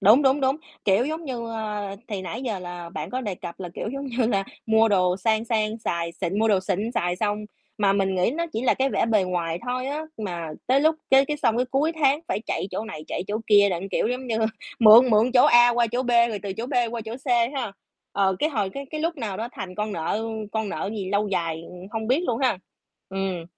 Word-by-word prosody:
đúng, 215 +8 +6
đúng, 270 +1 +3
đúng. 265 +1 +2 0.3
Kiểu, 200 +4 +3
giống 315 +3 -4
như, 245 -5 -4
ơ, 210 -3 -4
thì 200 -4 -4
nãy 190 +8 -5
giờ 225 -7 -2
là 175 -1 -7
bạn 155 -1 -5
có 255 - -2
đề 210 -6 -3
cập 175 0 -9
là, 180 - -4
kiểu, - - -4
giống 275 +4 -5
như 245 -2 0
là 195 -4 +1 0.2
mua 220 0 +4
đồ 180 -3 +2
sang 220 +3 +1
sang 220 -1 0
xài 170 -6 -2
xịn 190 +4 -3
mua 225 +1 +3
đồ 200 -3 +3
xịn 200 +4 -2
xài 175 -5 0
xong, 210 +1 0 0.4
mà 200 -2 +3
mình 195 -1 +1
nghĩ 185 +3 +2
nó 335 +6 -2
chỉ 225 - -2
là 255 - +3
cái 270 +1 +1
vẻ - - +1
bề 215 -4 +3
ngoài 170 -2 -2
thôi 255 +1 -2
á, 295 +3 -3 0.2
mà 175 -6 -4 0.2
tới 260 +3 +4
lúc 315 +2 +4 0.2
cái 270 0 +7
cái 300 - -2
xong 230 -6 +1
cái 250 +1 +1
cuối 295 +5 +1
tháng 295 -2 +2
phải 200 - -1
chạy - - -2
chỗ 220 - -3
này, 155 -8 -8
chạy - - -3
chỗ 205 - -1
kia, 205 -1 +6
đặng 180 +2 -3
kiểu, - - 0
giống 250 +1 -3
như, 230 -2 -1 0.4
mượn 235 +3 +8
mượn 220 +3 +4
chỗ 245 - +7
A 240 0 +7
qua 240 0 +2
chỗ 250 +1 +1
B, 245 - -2 0.2
rồi 215 -3 -3
từ 200 -2 -3
chỗ 225 +5 -5
B 275 - -8 0.2
qua 235 - -4
chỗ 220 +1 -5
C 270 - -19 0.3
ha, 235 -6 -3 0.4
ờ, 190 -1 +2
cái 305 - +2
hồi 210 -10 -1
cái 275 +6 -7
cái 310 - -4
lúc 330 +1 -1
nào 220 -8 -4
đó 225 +3 -4
thành 185 -1 -7
con 210 +1 -3
nợ 170 +5 -2 0.3
con 220 -2 -1
nợ 195 - -3
gì 195 -3 -4
lâu 205 +1 +1
dài 165 -4 -2 0.3
hông 220 -1 -3
biết 270 +7 +3
luôn 230 - 0
ha. 250 -8 +2 0.5
Ừm. 190 -3 -3
220 Hz, 250 wpm, -24 LUFS, 190-250 Hz, 0.5 s, mượn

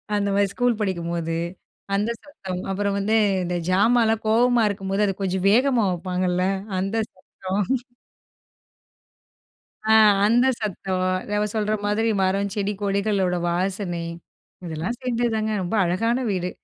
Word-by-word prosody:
அந்த 205 -1 0
மாரி 200 0 +3
ஸ்கூல் 245 -1 +1
படிக்கும்போது, 170 -4 -2 0.6
அந்த 210 +3 0
சத்தம். 190 -11 -6
அப்புறம் 200 +1 -1
வந்து 215 +3 +1 0.3
இந்த 180 0 -2
ஜாமான்லாம் 225 +3 +3
கோவமா 240 +2 +4
இருக்கும்போது 195 0 -1
அத 195 - 0
கொஞ்சம் 190 -1 -1
வேகமா 250 +1 +3
வைப்பாங்கல்ல 180 0 -1 0.4
அந்த 195 +3 -2 0.2
சத்தம். 190 +1 -4 2.2
ஆ - - +6 0.3
அந்த 240 +4 +4
சத்தம். 190 -2 -2 0.3
அவ 210 - +1
சொல்ற 215 0 0
மாதிரி, 220 +2 +1
மரம், 195 +1 0
செடி, 205 0 -1
கொடிகளோட 200 -2 +1
வாசனை. 180 -1 -2 0.6
இதெல்லாம் 170 +8 -4
சேர்ந்தது 240 -1 0
தாங்க 220 0 -1
ரொம்ப 180 +5 -2
அழகான 230 +9 0
வீடு. 180 -2 -1
200 Hz, 125 wpm, -23 LUFS, 185-220 Hz, 2.2 s, ஆ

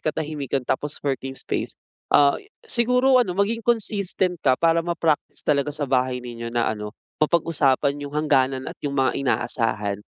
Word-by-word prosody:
katahimikan 145 -4 -3
tapos 145 +4 -1
working 135 -1 -3
space, - - -4 0.3
ah, 140 -1 +5 0.3
siguro 250 - +3
ano 185 -7 -1
maging 210 +4 +1
consistent 200 -6 +1
ka 130 -2 +3
para 165 0 +3
ma-practice 165 -2 -1
talaga 145 -1 +1
sa 145 0 -2
bahay 130 -1 +1
ninyo 115 -1 -6
na 115 -1 0
ano, 105 0 -7 0.2
mapag-usapan 145 -3 +2
'yong 145 0 -7
hangganan 130 -2 +2
at - - -5
'yong 140 -1 -3
mga 135 -1 +2
inaasahan 110 -6 -1
145 Hz, 150 wpm, -23 LUFS, 130-170 Hz, 0.3 s, ah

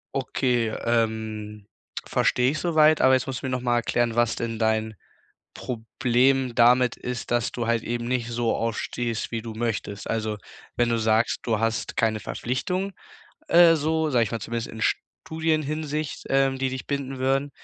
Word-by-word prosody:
Okay, 125 -3 0 0.2
ähm, 110 -2 -1 0.4
verstehe 125 +1 +2
ich 155 - -3
soweit, 155 -2 +4
aber 130 - +6
jetzt 130 0 +2
musst 130 -1 -4
du - - -6
mir 130 - -1
noch 125 -1 -2
mal 120 -1 +1
erklären, 120 0 0
was 120 -2 +2
denn 115 -1 -3
dein 110 0 0 0.6
Problem 125 +2 0
damit 125 +1 +4
ist, 125 -1 -5
dass 120 -1 +1
du 120 -2 -3
halt 115 -1 +1
eben 120 0 -3
nicht 120 -1 -1
so 120 -1 0
aufstehst, 115 0 -2
wie 115 -1 -2
du 115 - -6
möchtest. 110 -3 -3
Also, 110 -1 -2 0.4
wenn 120 -1 +2
du 115 -1 +1
sagst, 110 +1 +1
du 115 -3 0
hast 115 +1 -2
keine 110 -1 +1
Verpflichtung, 180 - -3 0.6
äh, 170 -1 +7
so, 160 +1 0
sage 120 -4 +3
ich 100 - -5
mal, 115 - -2
zumindest 115 0 -4
in 110 - -7
Studienhinsicht, 155 0 -2
ähm, 135 0 +2
die 130 0 0
dich 130 0 -6
binden 135 -2 -3
würden, 135 +2 0
120 Hz, 170 wpm, -25 LUFS, 115-135 Hz, 0.6 s, äh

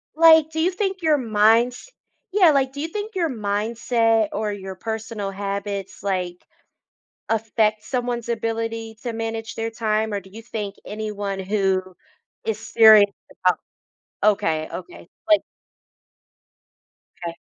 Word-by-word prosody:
Like, 320 -1 +7
do 320 - -3
you 355 +4 +2
think 385 -1 -2
your 310 -2 +3
minds 230 - +2 0.4
yeah, 365 -6 +6
like 270 -2 +2
do 285 - -9
you 315 - -2
think 420 +5 -5
your 335 -4 +1
mindset 225 0 +1
or 210 0 -2
your 190 -1 -7
personal 220 -1 -4
habits, 200 0 -4
like, 180 -3 -3 0.8
affect 220 -1 +1
someone's 245 -2 -2
ability 225 -1 -3
to 240 -2 -3
manage 225 -1 -4
their 225 0 -3
time? 220 -1 -1
Or 200 - 0
do 190 - -16
you 225 +3 -10
think 210 -3 -5
anyone 205 -2 -4
who 190 -1 +1 0.6
is 220 -2 -1
serious 220 -2 +7 0.4
about - - +4 0.6
okay, 160 -7 +2
okay. 175 -1 -9 0.2
Like 315 -1 +6 1.8
'Kay. 170 -1 -3
220 Hz, 130 wpm, -23 LUFS, 205-245 Hz, 1.8 s, Like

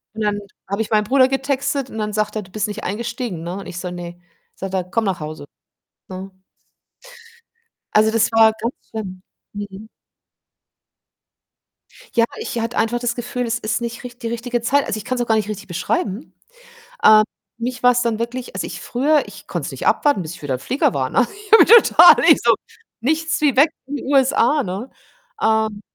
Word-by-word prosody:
Und 220 - -5
dann 205 -1 0 0.3
habe 200 +2 -1
ich 215 - -3
meinem 215 -1 +3
Bruder 255 +4 +4
getextet 270 0 -1
und - - -9
dann 210 -1 -3
sagt 215 0 -1
er: - - -2
„Du 185 -2 -15
bist 210 +1 -2
nicht 210 +1 -6
eingestiegen“, 230 - -4
ne? 175 +3 -5
Und 200 - -8
ich 175 - -7
so: 180 0 -5
„Ne." 175 0 -8 0.4
Sagt 190 0 -6
er: 190 -1 0
„Komm 210 +5 -1
nach 190 -4 -1
Hause.“ 155 -1 -7 0.6
Ne? 190 +1 -7 1.6
Also, 215 +1 +4
das 225 0 +2
war 225 -1 +6
ganz 235 +3 -2 0.2
schlimm. 190 -5 -6 0.3
Mhm. 205 0 -8 2.3
Ja, 230 -2 +4
ich 235 - -4
hatte 230 +1 -3
einfach 230 +2 +1
das 240 -1 -2
Gefühl, 245 0 -3
es 230 0 -1
ist 215 +2 -2
nicht 235 0 -5
richt 245 0 -10
die - - -2
richtige 235 +1 -3
Zeit. 280 +4 +2
Also, 215 - -3
ich 215 - -8
kann's 255 0 -2
auch 240 - -2
gar 220 - +3
nicht 215 -1 -1
richtig 205 -1 -6
beschreiben. 200 - -3 0.7
Ähm, 215 0 +8 0.4
mich 245 +2 -4
war's 250 0 +4
dann 230 -2 -1
wirklich 240 +2 -5
als - - -3
ich - - -7
früher 290 +4 +1
ich - - -13
konnte - - -4
es - - -5
nicht - - -6
abwarten, 290 -10 +2
bis 160 +1 -7
ich - - -14
wieder 140 -3 -2
im 125 - -4
Flieger 260 - 0
war, 130 -2 0
ne? 250 - +3
Ich 415 +1 -15
habe 450 - +9 0.2
total - - +7
ich - - +7
so: - - +5 0.5
„Nichts 320 +7 0
wie 290 -4 +2
weg 285 +5 +6 0.2
in 285 +2 -4
die - - -7
USA,“ 270 +1 +3
ne? 195 +6 -5 0.5
Ähm, 220 -1 +1
225 Hz, 200 wpm, -20 LUFS, 205-250 Hz, 2.3 s, habe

